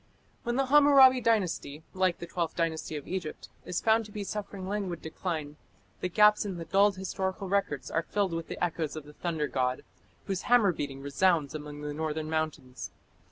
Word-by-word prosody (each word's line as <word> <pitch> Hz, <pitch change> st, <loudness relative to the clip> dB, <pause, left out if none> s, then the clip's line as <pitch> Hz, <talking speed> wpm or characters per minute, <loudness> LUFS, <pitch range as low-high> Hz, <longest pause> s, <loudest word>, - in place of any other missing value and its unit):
When 240 Hz, 0 st, -2 dB
the 270 Hz, +1 st, +2 dB
Hammurabi 270 Hz, -2 st, +7 dB
Dynasty, 180 Hz, -9 st, 0 dB
like 185 Hz, -2 st, +1 dB
the -, -, -7 dB
Twelfth 170 Hz, -1 st, -3 dB
Dynasty 160 Hz, -2 st, -1 dB
of 145 Hz, -, -6 dB
Egypt, 175 Hz, -4 st, -5 dB, 0.2 s
is 180 Hz, -, -2 dB
found 225 Hz, 0 st, +3 dB
to 210 Hz, -, -12 dB
be 205 Hz, 0 st, -4 dB
suffering 200 Hz, -1 st, -5 dB
languid 190 Hz, -4 st, -3 dB
decline, 160 Hz, -2 st, -4 dB, 0.4 s
the 180 Hz, -, -2 dB
gaps 210 Hz, +3 st, +5 dB
in 195 Hz, -4 st, -4 dB
the 165 Hz, -, -6 dB
dulled 200 Hz, +2 st, +4 dB
historical 190 Hz, +1 st, -3 dB
records 190 Hz, -8 st, -1 dB
are 165 Hz, -, +1 dB
filled 195 Hz, 0 st, -1 dB
with 165 Hz, 0 st, -3 dB
the -, -, -6 dB
echoes 160 Hz, -3 st, -1 dB
of 155 Hz, -, -6 dB
the 150 Hz, -, -13 dB
thunder 160 Hz, -2 st, -2 dB
god, 125 Hz, -1 st, -1 dB, 0.4 s
whose 190 Hz, -2 st, -2 dB
hammer 235 Hz, -6 st, +6 dB
beating 140 Hz, -3 st, -5 dB
resounds 150 Hz, +1 st, +2 dB
among 150 Hz, -1 st, -7 dB
the 150 Hz, 0 st, -4 dB
northern 155 Hz, 0 st, -3 dB
mountains. 155 Hz, -5 st, -3 dB
175 Hz, 185 wpm, -29 LUFS, 155-200 Hz, 0.4 s, Hammurabi